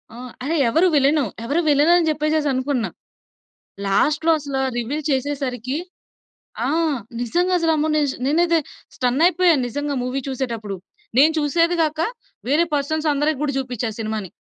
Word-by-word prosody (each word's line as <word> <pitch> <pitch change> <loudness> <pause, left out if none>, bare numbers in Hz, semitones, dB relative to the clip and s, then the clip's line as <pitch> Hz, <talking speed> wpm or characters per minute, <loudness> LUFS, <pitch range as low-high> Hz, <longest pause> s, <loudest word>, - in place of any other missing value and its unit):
ఆహ్, 250 +1 -9
అరె! 310 +5 -1
ఎవరు 325 +10 +3
విలను? 285 +1 +3 0.2
ఎవరు 290 +8 +1
విలనని 320 +4 +4
జెప్పేసేసనుకున్నా. 290 -5 0 1.0
లాస్ట్‌లో 300 +11 +2
అసల 280 -2 -4 0.2
రివీల్ 275 +6 -3
చేసేసరికీ 265 -2 -2 0.9
ఆ! - - 0 0.5
నిజంగసలు 345 +6 +1
అమ్మో! 310 +1 0
నేజ్ 290 -3 +1
నేనైతే 335 +3 +3 0.4
స్టన్నయిపోయా, 330 +7 +3
నిజంగా 290 +3 -3
మూవీ 255 +2 -2
చూసేడప్పుడు. 230 -7 -4 0.4
నేను 305 +4 +6
చూసేది 335 +4 +2
గాక, 310 -1 -1 0.5
వేరే 300 +6 +3
పర్సన్సందరికి 295 0 0
గూడా 285 -2 -1
జూపిచ్చా 250 -3 -3
సినిమాని. 215 -3 -3
290 Hz, 115 wpm, -21 LUFS, 255-315 Hz, 1.0 s, నేను